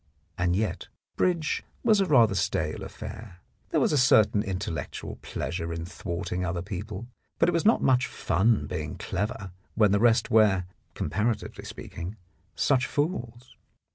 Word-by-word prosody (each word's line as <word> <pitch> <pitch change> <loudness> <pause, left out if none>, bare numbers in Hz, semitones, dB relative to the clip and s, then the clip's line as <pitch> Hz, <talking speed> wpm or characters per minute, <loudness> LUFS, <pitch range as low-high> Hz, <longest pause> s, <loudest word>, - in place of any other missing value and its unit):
And 90 0 +1
yet 105 +2 -2 0.3
bridge 170 -4 +1 0.2
was 215 -4 +4
rather 135 - +5
a - - -2
stale 90 - -1
affair. 105 -3 -8 0.3
There - - +2
was - - +2
a 145 - +4
certain 110 -4 +5
intellectual 95 -6 -4
pleasure 85 -1 -4
in 85 0 -4
thwarting 90 0 -4
other 85 -1 -2
people, 105 +2 -6 0.3
but 165 - +3
it - - +4
was 170 +1 0
not 225 - +4
much 125 -1 +3
fun 110 +5 +1
being - - -4
clever 100 -1 -3 0.2
when 105 -3 +4
the 100 - +3
rest 115 +1 +3
were, 105 -5 +4 0.3
comparatively 105 +9 -2
speaking, 85 +5 -7 0.4
such 130 -3 +2
fools. 125 -6 -3
105 Hz, 145 wpm, -27 LUFS, 90-125 Hz, 0.4 s, rather